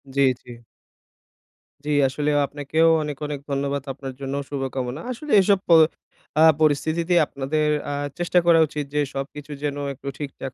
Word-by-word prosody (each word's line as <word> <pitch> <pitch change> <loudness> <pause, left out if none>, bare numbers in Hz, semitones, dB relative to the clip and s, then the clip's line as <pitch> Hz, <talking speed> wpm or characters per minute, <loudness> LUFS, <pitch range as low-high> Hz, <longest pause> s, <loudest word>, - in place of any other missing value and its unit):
জ্বী, 140 0 +4 0.2
জ্বী। - - -13 1.3
জ্বি 150 - -1 0.2
আসলে 145 +3 -2 0.2
আপনাকেও 145 +3 +1 0.2
অনেক, 150 -2 -5
অনেক, 145 -1 -4
ধন্যবাদ 140 0 -1
আপনার 135 -1 -7
জন্য 135 0 -4 0.2
শুভকামনা। 135 0 -3
আসলে 290 +4 -7
এসব 195 0 +3
প - - -29 0.7
আ - - +8 0.2
পরিস্থিতিতে 160 +3 +1
আপনাদের 150 +3 -1 0.2
আ - - -2 0.3
চেষ্টা 175 +1 +3
করা 165 -1 +6
উচিত 145 0 -4
যে 150 - +1
সবকিছু 140 +2 -6
যেন 145 -1 -2 0.2
একটু 140 +1 -12
ঠিকঠাক 135 -2 -6
145 Hz, 150 wpm, -23 LUFS, 135-155 Hz, 1.3 s, আ